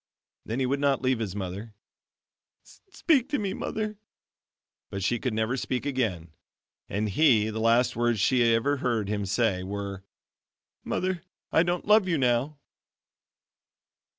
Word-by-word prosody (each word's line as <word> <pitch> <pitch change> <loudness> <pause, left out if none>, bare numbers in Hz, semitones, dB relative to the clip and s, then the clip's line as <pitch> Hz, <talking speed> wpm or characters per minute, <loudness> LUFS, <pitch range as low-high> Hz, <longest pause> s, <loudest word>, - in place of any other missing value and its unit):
Then 115 +4 -3
he 130 - +1
would 140 +2 0
not 140 -2 +1
leave 130 -2 +2
his 100 -4 -3
mother. 100 +3 -6 0.9
"Speak 310 - -1
to 290 - 0
me, 195 -2 -2
Mother!" 215 0 -4 0.9
but 100 -1 -4
she 120 +4 +1
could 125 - -1
never 110 +3 0
speak 130 0 -3
again, 110 - -2 0.6
and 105 +3 -1
he 110 -1 +3
the 110 - -4
last 115 +2 +3
words 120 -1 +1
she 130 +5 +3
had 120 -1 +4
ever 140 +5 +1
heard 115 -6 -1
him 105 -1 -2
say, 100 -2 +1
were, 100 0 -5 0.8
"Mother, 185 -1 -2 0.3
I - - +5
don't 175 0 -1
love 210 -2 +5
you 170 -3 +1
now." 130 +3 +1
120 Hz, 150 wpm, -27 LUFS, 105-145 Hz, 0.9 s, I